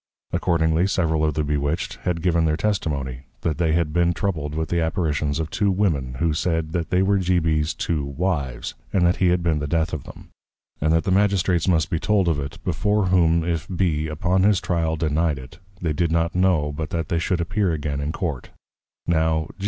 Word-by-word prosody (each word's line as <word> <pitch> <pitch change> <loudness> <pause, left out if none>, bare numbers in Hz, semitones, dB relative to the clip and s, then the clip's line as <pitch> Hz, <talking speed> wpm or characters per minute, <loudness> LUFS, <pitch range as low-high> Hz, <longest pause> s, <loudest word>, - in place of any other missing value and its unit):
Accordingly 80 +1 +2
several 80 -5 +1
of 75 -2 +1
the 75 - 0
Bewitched, 75 +2 -1
had 85 -3 -1
given 85 -2 +2
in 80 - +3
their 80 -1 +1
Testimony, 70 - -2 0.2
that 80 0 -1
they 80 -2 +2
had 80 -2 0
been 85 0 +2
troubled 75 -6 -2
with 80 0 -2
the 85 -1 +1
Apparitions 75 -3 0
of 80 0 -3
two 100 -2 +1
Women, 80 -11 0
who 80 +4 0
said, 80 0 -1
that 85 -1 -2
they 90 +1 +2
were 100 +1 +2
G. 90 -1 +2
B's 80 -2 +1
two 80 -4 -1
Wives, 70 -4 -2 0.2
and 90 -2 +2
that 85 - +3
he 95 - +2
had 90 0 +2
been 80 -3 +1
the 75 - -3
Death 80 +2 0
of 80 - -4
them; - - -12 0.5
and 80 +2 +2
that 80 0 +3
the 95 - -1
Magistrates 95 -3 +2
must 80 -5 +2
be 80 - 0
told 100 0 +2
of 80 -4 +1
it, 70 -1 -5
before 105 -3 +1
whom 85 -2 +3
if 85 -2 -2
B. 85 -4 0
upon 85 +5 0
his 100 -1 +4
Tryal 85 -2 0
denied 80 -1 +1
it, 65 0 -11 0.2
they 80 -3 -1
did 85 +1 0
not 85 0 +1
know 90 -5 +2
but 75 +1 -5
that 80 -2 -3
they 85 - +1
should 85 +1 0
appear 90 +2 0
again 75 -2 -2
in 70 +2 -2
Court. 80 -7 -4
80 Hz, 210 wpm, -23 LUFS, 75-90 Hz, 0.5 s, his